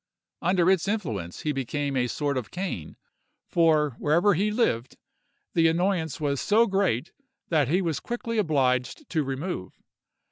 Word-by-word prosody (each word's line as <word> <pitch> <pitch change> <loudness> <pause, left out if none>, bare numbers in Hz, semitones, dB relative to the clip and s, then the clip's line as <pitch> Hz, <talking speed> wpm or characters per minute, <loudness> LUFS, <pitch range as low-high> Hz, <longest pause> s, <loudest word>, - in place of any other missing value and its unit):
Under 180 -1 +2
its 190 -1 +1
influence 115 - -3
he 150 - 0
became 140 +1 -2
a 125 -1 +1
sort 145 +3 -1
of 125 -4 -3
Cain; 180 - -5 0.5
for, 155 -3 +3
wherever 170 +7 +3
he 200 +5 +1
lived, 170 - 0 0.6
the 165 -1 +4
annoyance 165 -2 0
was 140 -3 -1
so 220 +3 +4
great 190 - 0 0.4
that 150 -5 +3
he 180 +7 +2
was 160 -5 -1
quickly 230 -1 -3
obliged 135 - 0
to 160 -3 +1
remove. 135 - -5
160 Hz, 145 wpm, -26 LUFS, 135-190 Hz, 0.6 s, the